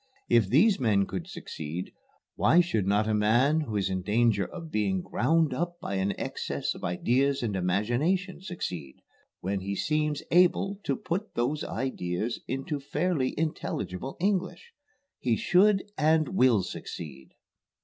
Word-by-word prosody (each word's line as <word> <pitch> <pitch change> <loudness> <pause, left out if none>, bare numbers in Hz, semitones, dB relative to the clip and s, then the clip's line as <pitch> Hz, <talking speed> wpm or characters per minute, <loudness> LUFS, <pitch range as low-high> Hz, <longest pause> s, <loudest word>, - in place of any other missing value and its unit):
If 115 -5 +4
these 190 - +4
men 105 -6 +3
could 90 -2 -5
succeed, 80 +4 -6 0.4
why 170 - +4
should 110 - +1
not 105 +2 +2
a 110 - +1
man 120 +9 +3
who 115 -8 -4
is 100 -2 +1
in 95 -1 -2
danger 105 +1 +2
of 165 -1 -9
being 95 -4 0
ground 155 +2 +1
up 175 +5 -3
by - - -5
an 95 +1 -1
excess - - -3
of - - -12
ideas 130 +10 +1
and 105 -4 -1
imagination 120 - 0
succeed, 90 - -5 0.5
when 95 +2 -1
he 100 +1 -3
seems 150 +3 0
able 185 +3 +3
to 140 - +1
put 195 +10 -4
those 140 +6 0
ideas 110 -3 -3
into 135 +3 -3
fairly 145 -1 -1
intelligible 135 - -3
English? 195 - -1 0.5
He 120 -3 +1
should 195 - +4 0.2
and 155 0 +3
will 125 - +4
succeed." 70 -6 -8
125 Hz, 145 wpm, -28 LUFS, 100-160 Hz, 0.5 s, If